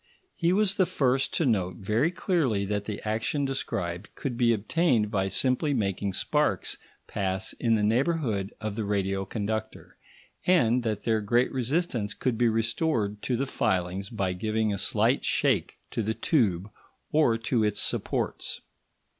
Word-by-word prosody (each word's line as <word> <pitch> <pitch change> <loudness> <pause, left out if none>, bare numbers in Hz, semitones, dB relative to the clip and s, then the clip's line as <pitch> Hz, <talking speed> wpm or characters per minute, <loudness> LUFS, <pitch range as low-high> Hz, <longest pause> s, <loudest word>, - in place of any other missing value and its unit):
He 170 +1 +1
was 200 +1 +3
the 185 -3 +3
first 135 -6 +1
to 165 - +1
note 95 -7 +1
very 110 +10 +1
clearly 155 - 0
that 100 0 -2
the 105 -1 -5
action 115 +7 0
described 100 -9 -3
could 130 -4 -3
be 120 -1 +3
obtained 115 - +1
by 95 -2 +1
simply 135 - +1
making 100 -3 -1
sparks - - 0 0.3
pass 95 -2 -2
in 115 -2 +3
the 105 - +1
neighbourhood 115 - +1
of 110 -2 -4
the 110 - -2
radio 95 -1 -1
conductor, 110 +2 -4 0.5
and 125 -9 +4
that 110 -3 -2
their 110 -2 +1
great 120 +5 +2
resistance 130 - -1
could 130 -3 -1
be 120 +1 +3
restored 115 -1 0
to 125 - -1
the 135 - 0
filings 95 -5 -1
by 100 -5 -1
giving 110 +3 0
a 100 - -3
slight - - +2
shake - - +1
to - - -1
the 110 +1 -1
tube 105 - +1 0.4
or 150 -7 +3
to 115 0 0
its 105 -1 +1
supports. - - -2
110 Hz, 155 wpm, -27 LUFS, 100-130 Hz, 0.5 s, and